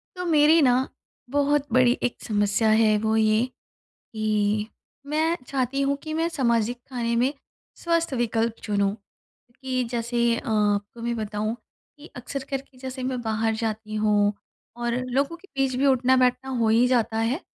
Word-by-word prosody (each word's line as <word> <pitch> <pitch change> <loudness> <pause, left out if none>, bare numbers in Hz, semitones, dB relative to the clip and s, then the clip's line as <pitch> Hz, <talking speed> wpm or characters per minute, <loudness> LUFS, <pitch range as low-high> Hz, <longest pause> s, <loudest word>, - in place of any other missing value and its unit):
तो 360 - -4
मेरी 315 0 +5
ना 255 0 +3 0.4
बहुत 285 +1 +1
बड़ी 255 -1 +5
एक 245 - -2
समस्या 210 0 +1
है 215 -1 +4
वो 220 +1 0
ये, 220 +1 +3 0.5
कि 215 -1 -1 0.4
मैं 315 +3 +1
चाहती 270 0 -1
हूँ 280 +1 +1
कि 310 - -5
मैं 325 +1 +1
सामाजिक 240 -6 0
खाने 235 -3 -2
में 250 +4 +2 0.4
स्वस्थ 335 -3 0
विकल्प 230 -2 0
चुनूँ 200 -2 0 0.7
कि 255 -1 -1
जैसे 235 0 -1 0.2
अ, - - -7
आपको 210 +1 0
मैं 235 0 -1
बताऊँ 215 0 -2 0.4
कि 295 - -12
अक्सर 265 +2 -5
करके 270 -1 -5
जैसे 260 0 -6
मैं 255 -1 -2
बाहर 220 0 0
जाती 215 -1 -4
हूँ 205 -1 +3 0.4
और 240 0 -1 0.2
लोगों 275 +6 0
के 390 +3 -20
बीच 265 -1 +1
भी 275 +2 +2
उठना-बैठना 255 0 +3
हो 230 -2 +2
ही 230 +3 +4
जाता 230 -3 +1
है, 235 +8 0
240 Hz, 155 wpm, -25 LUFS, 220-270 Hz, 0.7 s, मेरी